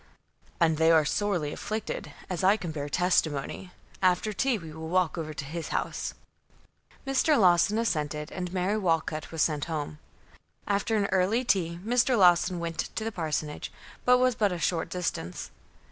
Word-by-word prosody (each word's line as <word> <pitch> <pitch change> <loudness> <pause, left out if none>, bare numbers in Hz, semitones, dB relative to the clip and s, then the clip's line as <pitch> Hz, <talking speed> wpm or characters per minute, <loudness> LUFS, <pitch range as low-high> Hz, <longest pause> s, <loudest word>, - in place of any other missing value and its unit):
"And 160 -3 +3
they 160 +1 +4
are 160 -2 +5
sorely 170 -3 0
afflicted, 215 +1 -4 0.2
as 180 -1 -3
I 195 +3 +5
can 175 -6 -5
bear 145 -2 -4
testimony. 175 0 0 0.3
After 185 +3 +2
tea 255 +3 +1
we 165 -5 -9
will 160 0 -7
walk 180 -2 +2
over 160 -2 -4
to 150 -1 -6
his 165 +3 -5
house." - - -3 0.9
Mr. 270 +2 +3
Lawson 185 +2 +4
assented, 150 -9 -1
and 180 -1 -4
Mary 190 +3 0
Walcut 165 -4 -1
was 165 -2 +1
sent 150 -3 0
home. 150 -2 -4 0.7
After 205 +2 +1
an 205 - +2
early 190 +6 +2
tea, 170 -8 +1
Mr. 245 +2 +3
Lawson 180 -1 +4
went 170 -1 -4 0.2
to 220 - -2
the 225 - -2
parsonage, 155 -5 -3 0.3
which 250 0 +6
was 255 0 +3
but 210 -3 +1
a 180 - -2
short 170 -1 -1
distance. 165 - -4
180 Hz, 165 wpm, -28 LUFS, 160-205 Hz, 0.9 s, which